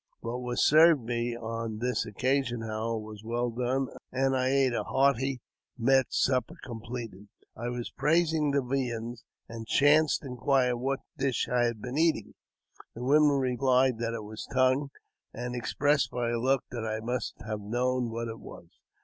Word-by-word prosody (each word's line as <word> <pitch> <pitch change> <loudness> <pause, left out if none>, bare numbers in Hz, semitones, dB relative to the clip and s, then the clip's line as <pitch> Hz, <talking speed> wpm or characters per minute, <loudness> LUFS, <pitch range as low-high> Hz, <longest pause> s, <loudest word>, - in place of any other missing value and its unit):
What 120 +2 -4
was 125 0 0
served 155 -2 +6
me 120 0 -2
on 115 -1 -4
tl 125 +3 -1
occasion, 125 +2 0
however, 110 +1 -2
was 110 -1 -9
well 120 +1 -1
done, 125 +3 0 0.3
and 135 +1 +1
I 130 0 +1
ate 135 -2 +3
a - - -1
hearty 135 -1 +1 0.4
met 130 +2 +3
Supper 130 +5 +1
completed, 115 -4 -7 0.3
I 120 +2 -4
was 120 -1 -5
praising 160 -1 +2
the 140 -1 +1
viands, 120 -2 -3 0.2
and 115 -1 -8
chanced 145 +3 +4
inquire 125 -1 +1
what 135 +3 -2 0.2
dish 135 -3 0
I 120 -1 +2
had 115 -3 -3
been 125 +4 -3
eating. 160 -10 +1 0.6
The 120 - -6
woman 145 +2 +4
replied 130 -1 +2
th£ 115 0 -2
it 110 - -5
was 105 +1 -8
tongue, 130 +2 +2 0.5
and 125 +1 -4
expressed 140 +2 +1
by 120 -1 -2
her 120 0 -1
looks 130 +2 +1
that 120 -2 -4
I 110 -1 -2
must 120 +3 -3
ha^ 110 -1 -5
known 125 +3 0
what 115 +1 -4
it 115 0 -7
was. 85 - -12
125 Hz, 165 wpm, -29 LUFS, 115-135 Hz, 0.6 s, served